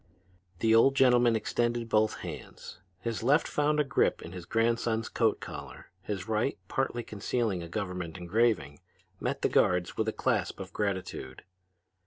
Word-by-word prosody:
The 110 0 +4
old 135 +4 +6
gentleman 125 -3 +5
extended 120 +1 0
both 110 -1 +1
hands. - - -8 0.2
His 115 +2 -3
left 140 +7 +3
found 150 +1 +1
a - - +5
grip 140 - +1
in 85 - -8
his 90 -2 -8
grandson's 115 +1 +1
coat 115 -2 +1
collar; - - -9
his 95 0 -4
right, 110 +5 0
partly 120 -1 -1
concealing 105 -2 -2
a 85 - -7
government 90 -3 -4
engraving, 90 -6 +1 0.4
met - - -3
the - - +5
guard's 90 -1 +2
with 110 - 0
a - - +2
clasp 110 -6 -1
of 95 -1 -8
gratitude. 95 -10 -3
110 Hz, 155 wpm, -29 LUFS, 95-120 Hz, 0.4 s, old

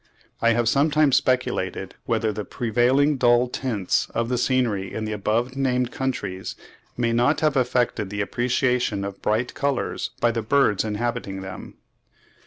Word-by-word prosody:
I 115 0 +4
have 120 0 +1
sometimes 145 +1 +3
speculated 95 -7 -1
whether 110 -2 0
the 105 - -4
prevailing 125 +7 +2
dull 120 0 +4
tints 120 -7 -1
of 115 0 0
the 125 - 0
scenery 115 -7 0
in 110 - -4
the 110 - -4
above 110 +5 -1
named 125 -2 0
countries 100 -8 -3 0.4
may 120 -1 +1
not 125 +6 +2
have 155 -2 +2
affected 125 -5 +1
the 100 0 -3
appreciation 125 -2 0
of 100 0 -7
bright 110 +4 0
colours 140 -2 -2
by 120 - +3
the 115 0 -2
birds 110 -3 +2
inhabiting 105 -3 -3
them.) 95 0 -8
120 Hz, 150 wpm, -24 LUFS, 105-130 Hz, 0.4 s, I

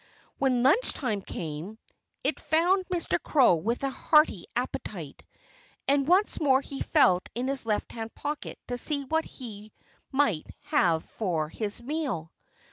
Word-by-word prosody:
When 255 -3 +2
lunch 340 - +4
time 220 -8 -2
came, 170 +4 -6 0.5
it - - 0
found 360 +4 +2
Mr. 355 -2 -1
Crow 270 - +5
with 230 +11 -2
a 275 - 0
hearty 305 +3 +3
appetite. - - -4 0.7
And 275 0 +3
once 375 +5 +3
more 270 -4 +4
he 275 0 -7
felt 185 - +3
in 245 +2 -1
his 270 -4 -2
left 210 -1 -1
hand 225 -1 -6
pocket 295 0 -4
to 245 0 -3
see 285 0 -1
what 320 +4 0
he 215 -4 -9 0.4
might 265 - +1 0.2
have 165 -3 +3
for 165 -8 -2
his 215 +6 -3
meal. 255 - -3
260 Hz, 145 wpm, -28 LUFS, 210-295 Hz, 0.7 s, Crow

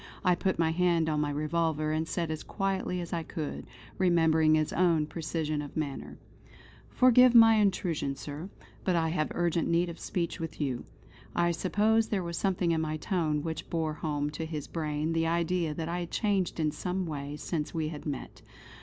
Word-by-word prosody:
I 180 - +5
put 190 +2 0
my 160 -1 +2
hand 170 -1 +2
on 150 -1 +1
my 150 - 0
revolver, 155 +1 0
and 160 +1 -1
said 170 -1 -2
as 155 - -4
quietly 195 -2 -2
as 170 - -6
I 170 - 0
could, 155 -2 -5 0.3
remembering 160 -3 +4
his 155 -1 0
own 170 -4 +3
precision 155 -1 -3
of 145 +1 -8
manner: 145 -3 -4 0.7
"Forgive 250 -1 +6
my 225 -1 +8
intrusion, 180 -8 +1
Sir; 145 +6 -7 0.3
but 185 - +1
I 165 -1 +2
have 155 -2 -1
urgent 170 -1 +1
need 170 +1 +2
of 170 - -8
speech 175 0 -3
with 165 -1 -6
you." 135 -5 -2 0.5
I 175 0 +3
suppose 215 +6 +2
there 195 -4 -1
was 170 0 -4
something 180 -2 +1
in 160 -1 +1
my 155 -1 -2
tone 155 -4 -1
which 160 -1 -5
bore 160 -2 -1
home 150 -1 -2
to 160 +2 -4
his 150 -3 -4
brain 155 0 -2
the 165 0 +1
idea 170 -1 0
that 160 +1 -3
I 175 +1 -2
had 175 -1 -4
changed 195 -6 0
in 155 -1 +1
some 185 +3 -3
way 145 -2 -5
since 150 +1 -3
we 155 -2 -2
had 155 -1 -7
met. 140 -3 -5
165 Hz, 190 wpm, -29 LUFS, 155-180 Hz, 0.7 s, my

